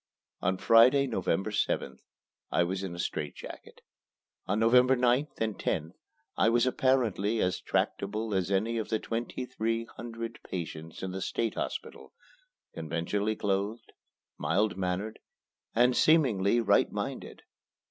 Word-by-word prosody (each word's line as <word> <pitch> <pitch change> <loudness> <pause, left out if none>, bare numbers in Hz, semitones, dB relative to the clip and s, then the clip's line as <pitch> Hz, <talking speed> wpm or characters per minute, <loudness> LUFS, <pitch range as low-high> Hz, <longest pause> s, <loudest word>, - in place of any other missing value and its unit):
On 95 +1 +1
Friday, 125 +7 +6
November 95 -4 -1
7th, 105 - -1 0.5
I 85 - +3
was 95 +2 -2
in 95 -3 -5
a - - -9
strait 75 -4 -3
jacket. - - -11 0.7
On 105 +3 +1
November 125 +3 +5
9th 125 +4 +1
and 110 -2 -2
10th 80 -1 -1 0.4
I 110 - +3
was 120 +1 +3
apparently 120 -5 +1
as 90 -2 0
tractable 105 +2 -1
as 95 -1 0
any 110 +4 +1
of 110 - -4
the 110 - +1
twenty 120 +3 -4
three 115 -2 -2
hundred 115 0 -7
patients 80 -2 -6
in 95 - -3
the 95 +1 -5
State 115 +3 -1
Hospital - - -5 0.6
conventionally 85 +7 -2
clothed, 105 +3 -2 0.5
mild 100 +8 +1
mannered, 95 +3 -3 0.6
and, 125 +2 +4
seemingly, 120 -10 +4
right 100 -3 +3
minded. - - -5
110 Hz, 135 wpm, -29 LUFS, 95-115 Hz, 0.7 s, Friday